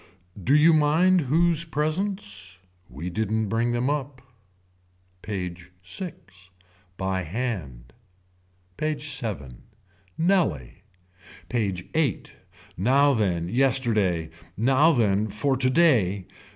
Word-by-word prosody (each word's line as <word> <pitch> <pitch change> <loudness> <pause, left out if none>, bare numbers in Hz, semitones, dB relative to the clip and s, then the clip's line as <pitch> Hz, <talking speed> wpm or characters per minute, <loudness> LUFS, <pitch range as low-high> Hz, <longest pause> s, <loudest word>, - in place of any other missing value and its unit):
Do 135 +8 +3
you 160 +2 +6
mind 160 +5 +4
whose 165 +3 +2
presents. 155 - -3 0.3
We 80 +9 -6
didn't 110 +2 -1
bring 115 +2 0
them 120 +2 0
up. 140 -2 -3 1.0
PAGE 90 -3 -6
VI. 165 - -4 0.8
By 95 0 -1
hand. 80 - -5 0.8
PAGE 150 -2 -1
VII. 70 - -5 0.6
Nellie. 160 - 0 0.7
PAGE 100 -7 -2
VIII. 150 - 0 0.5
Now 135 +9 +3
then 90 -8 0
yesterday. 110 -9 +1 0.3
Now 135 - +4
then 110 -6 +2
for 110 +7 0
today. 130 - +2
120 Hz, 95 wpm, -25 LUFS, 95-150 Hz, 1.0 s, you